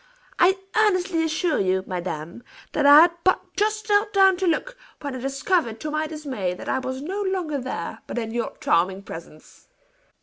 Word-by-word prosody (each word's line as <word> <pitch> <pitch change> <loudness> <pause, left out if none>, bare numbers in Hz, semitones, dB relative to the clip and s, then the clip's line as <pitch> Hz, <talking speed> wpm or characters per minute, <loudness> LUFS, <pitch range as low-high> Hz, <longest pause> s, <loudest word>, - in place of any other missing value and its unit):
I 375 +2 +5 0.2
earnestly 370 -5 +2
assure 320 +1 0
you, 190 -1 +1
madame, 175 +1 -5 0.3
that 290 -2 +2
I 290 +2 +10
had 345 +1 +5
but 370 - +4 0.2
just 430 +1 0
knelt 415 0 +2
down 385 -1 +6
to 375 0 -1
look, 425 +10 -1 0.3
when 285 -3 -4
I - - -5
discovered 275 - -1
to 305 - -4
my 310 +1 -1
dismay, 270 - -4
that - - -10
I 265 - 0
was 260 +1 -5
no 385 +6 -3
longer 365 -7 -1
there, 250 -10 -5
but - - -6
in 225 -2 -3
your 235 0 -3
charming 185 +3 +1
presence." 165 -4 -12
300 Hz, 180 wpm, -24 LUFS, 225-370 Hz, 0.3 s, I